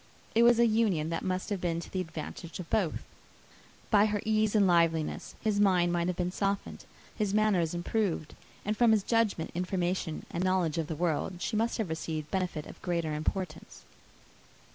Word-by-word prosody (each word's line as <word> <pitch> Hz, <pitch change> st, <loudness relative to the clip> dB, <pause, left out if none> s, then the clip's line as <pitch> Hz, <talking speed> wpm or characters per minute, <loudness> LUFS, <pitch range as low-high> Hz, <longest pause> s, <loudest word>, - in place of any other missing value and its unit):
It 230 Hz, -, +4 dB
was 235 Hz, 0 st, +6 dB
an 235 Hz, -2 st, +4 dB
union 185 Hz, -9 st, +1 dB
that 165 Hz, -, -1 dB
must 185 Hz, +2 st, -2 dB
have 195 Hz, -3 st, -1 dB
been 170 Hz, -2 st, 0 dB
to 170 Hz, -, -9 dB
the 185 Hz, -, -1 dB
advantage 165 Hz, 0 st, -7 dB
of 180 Hz, -, -6 dB
both: 180 Hz, -7 st, 0 dB, 0.9 s
by 210 Hz, -1 st, +6 dB
her 210 Hz, -1 st, -1 dB
ease 215 Hz, 0 st, +2 dB
and 205 Hz, -2 st, +5 dB
liveliness, 165 Hz, -3 st, +1 dB
his 210 Hz, -2 st, +1 dB
mind 180 Hz, -4 st, +4 dB
might 170 Hz, 0 st, +1 dB
have 180 Hz, -, -1 dB
been 180 Hz, 0 st, -1 dB
softened, 200 Hz, +1 st, -2 dB, 0.3 s
his 210 Hz, -2 st, 0 dB
manners 190 Hz, -6 st, +2 dB
improved; 175 Hz, -3 st, -1 dB, 0.3 s
and 210 Hz, +1 st, 0 dB
from 230 Hz, 0 st, +5 dB
his 210 Hz, -3 st, +2 dB
judgment, 225 Hz, -8 st, +1 dB
information, 180 Hz, -2 st, -2 dB
and 175 Hz, -, -2 dB
knowledge 180 Hz, -4 st, +1 dB
of 160 Hz, -, -2 dB
the 160 Hz, -, -3 dB
world, 170 Hz, +2 st, 0 dB
she 215 Hz, -, -2 dB
must 225 Hz, +2 st, +1 dB
have 220 Hz, -7 st, -2 dB
received 160 Hz, -1 st, -4 dB
benefit 180 Hz, -5 st, -2 dB
of -, -, -12 dB
greater 170 Hz, -3 st, -1 dB
importance. 155 Hz, +2 st, -4 dB
185 Hz, 185 wpm, -30 LUFS, 165-210 Hz, 0.9 s, was